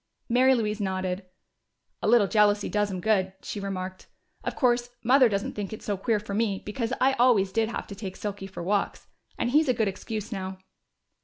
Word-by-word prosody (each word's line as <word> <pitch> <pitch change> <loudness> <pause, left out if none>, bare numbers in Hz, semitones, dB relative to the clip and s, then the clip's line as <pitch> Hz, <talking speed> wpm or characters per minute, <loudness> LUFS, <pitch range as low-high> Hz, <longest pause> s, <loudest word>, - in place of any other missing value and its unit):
Mary 260 +2 +5
Louise 215 -2 -1
nodded. 185 -1 -2 0.7
"A - - -1
little 230 -2 +6
jealousy 205 0 +3
does 205 -1 0
'em 185 -2 -4
good," 190 -2 +2
she 210 - -5
remarked. 185 -1 -5 0.4
"Of - - -3
course, 245 -2 +2
Mother 255 +1 +6
doesn't 200 -1 -2
think 205 -2 -4
it's 220 - -8
so 205 - 0
queer 215 +3 0
for 205 -1 -7
me, 205 -2 0
because 225 +3 -3
I 265 +1 +4
always 220 -6 +4
did 225 +2 +1
have - - -4
to - - -9
take 190 -2 -6
Silky 200 -2 -5
for 190 -3 -7
walks. 200 +3 -1 0.3
And 240 - 0
he's 300 +1 +4
a 250 - +3
good 220 -2 +1
excuse 215 +3 -4
now." 190 -2 -4
210 Hz, 200 wpm, -27 LUFS, 195-230 Hz, 0.7 s, little